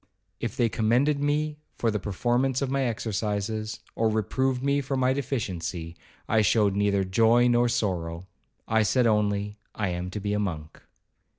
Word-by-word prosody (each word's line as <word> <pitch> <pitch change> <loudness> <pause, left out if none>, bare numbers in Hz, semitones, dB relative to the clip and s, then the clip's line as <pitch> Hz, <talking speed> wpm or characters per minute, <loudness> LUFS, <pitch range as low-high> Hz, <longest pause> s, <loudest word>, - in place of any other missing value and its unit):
If - - -4
they 120 - +3
commended 120 +7 +2
me 150 +1 0 0.2
for 115 - +1
the 105 - -1
performance 120 +7 0
of 135 - -2
my 135 -1 +1
exercises, 110 -1 -2
or 110 -1 +1
reproved 125 +4 0
me 140 +1 +2
for 135 0 -2
my 130 0 +3
deficiency, 90 -11 -3 0.3
I 110 0 +3
showed 105 -1 +3
neither 100 -1 +2
joy 115 +6 +4
nor 120 0 +3
sorrow,—I 95 0 -2
said 120 +4 +2
only, 105 -1 +1 0.2
'I 100 -3 -1
am 90 +1 -3
to 105 - -5
be 105 +1 -2
a 105 - 0
monk.' 80 -6 -4
110 Hz, 160 wpm, -26 LUFS, 100-125 Hz, 0.3 s, joy